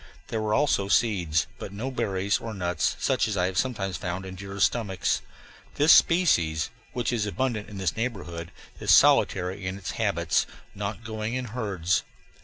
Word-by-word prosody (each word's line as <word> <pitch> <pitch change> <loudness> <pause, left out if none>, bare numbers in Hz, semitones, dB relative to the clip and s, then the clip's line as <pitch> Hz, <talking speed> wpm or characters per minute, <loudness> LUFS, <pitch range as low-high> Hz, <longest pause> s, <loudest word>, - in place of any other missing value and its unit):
There 110 - -2
were 110 0 +1
also 135 -9 +2
seeds, 95 -8 +2
but - - -6
no 115 +7 -4
berries 100 -5 0
or 115 -2 -6
nuts 90 -4 0
such - - +1
as 105 -2 -2
I 90 - +2
have 95 0 -2
sometimes 105 -8 -2
found 90 +2 -4
in 95 - -7
deer's 100 +1 -3
stomachs. 100 -6 0 0.5
This 150 +3 +6
species, 85 - +3 0.2
which 125 0 -1
is 105 -3 0
abundant 115 -1 -2
in 105 - -8
this 95 -4 -1
neighborhood, 90 -8 -4 0.3
is - - -5
solitary 95 +1 +4
in 95 +1 -3
its 100 - -5
habits, - - +1 0.3
not 105 +2 -5
going 110 +1 -3
in 130 0 -2
herds. 95 -7 0
100 Hz, 170 wpm, -26 LUFS, 95-115 Hz, 0.5 s, This